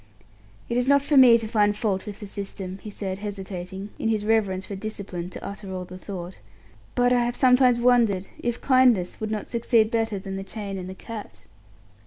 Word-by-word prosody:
"It 235 - -1
is 245 +1 +1
not 280 0 +5
for 290 - +1
me 250 -3 +8
to 225 -1 -4
find 210 -2 +2
fault 210 -3 -1
with 205 0 -6
the - - -5
system," 195 -1 -6
he 215 - -7
said, 195 -2 -5
hesitating, 195 -1 -6
in 225 - 0
his 215 -2 0
reverence 200 -4 +1
for 200 - -6
"discipline", 190 -4 -6
to - - -8
utter 200 -1 -7
all 185 -1 -4
the 185 0 -10
thought; 185 -2 -7 0.6
"but 245 0 +3
I 245 -1 +3
have 240 0 -1
sometimes 250 -2 +5
wondered 235 -6 +3
if 240 0 -2
kindness 250 -9 +3
would 215 - -2
not 215 -1 -3
succeed 230 -2 +2
better 225 -3 0
than 195 0 -6
the 195 - -4
chain 200 -1 -6
and 185 0 -6
the 190 - -7
cat." 205 - -9
210 Hz, 205 wpm, -25 LUFS, 190-235 Hz, 0.6 s, me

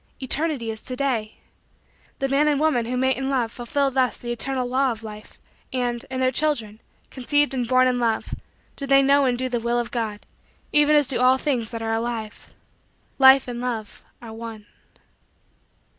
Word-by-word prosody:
Eternity 270 -3 -1
is 220 - -7
to 255 - -5
day. 245 -5 -2 0.8
The 270 - -1
man 280 +3 +2
and 290 -2 +2
woman 295 -7 +1
who 250 +1 -2
mate 260 0 +1
in 265 0 -2
love 245 -5 0
fulfill 275 +4 -1
thus 255 -3 +1
the 240 - -6
eternal 255 +2 -2
law 260 +1 +1
of 225 -1 -7
Life, 215 -1 -10 0.3
and, 245 -2 -2
in 260 0 -4
their 255 0 +2
children, 230 -7 0 0.3
conceived 290 +2 +1
and 250 -3 -2
born 255 +1 +4
in 250 -1 0
Love, 230 -2 -1 0.4
do 280 - -5
they 275 0 +5
know 280 +1 +4
and 250 -2 +1
do 255 +1 -2
the 245 -2 -2
will 235 +1 -1
of 240 -1 -2
God, 220 -4 -3 0.5
even 295 0 +4
as 295 -1 +5
do 260 -2 0
all 255 +1 +5
things 255 -6 -1
that 230 -1 -6
are 225 0 -1
alive. 225 -1 -4 0.7
Life 265 0 +7
and 240 -1 -5
Love 230 -4 -5 0.2
are 225 -1 -9
one. 225 -2 -8
250 Hz, 190 wpm, -23 LUFS, 230-270 Hz, 0.8 s, Life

